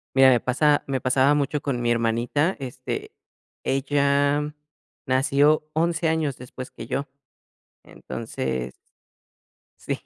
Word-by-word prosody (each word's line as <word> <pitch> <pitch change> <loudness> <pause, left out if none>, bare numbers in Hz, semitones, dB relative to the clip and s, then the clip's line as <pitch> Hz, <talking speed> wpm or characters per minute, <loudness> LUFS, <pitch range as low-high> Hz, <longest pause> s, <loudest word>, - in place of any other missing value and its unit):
mira, 135 0 +7
me 125 -2 +5
pasa 145 +3 +2
me 135 -1 -1
pasaba 130 +3 +3
mucho 145 0 0
con 135 -5 -2
mi 120 - 0
hermanita, 120 +9 +1
este, 130 -3 -5 0.5
ella 140 +2 +1 0.5
nació 145 +3 +3
11, 165 0 +1
años, 155 -4 0
después 125 0 -9
que - - -9
yo, 135 +4 -3 0.8
entonces 65 -1 -5 1.2
sí, - - 0
140 Hz, 115 wpm, -24 LUFS, 125-150 Hz, 1.2 s, mira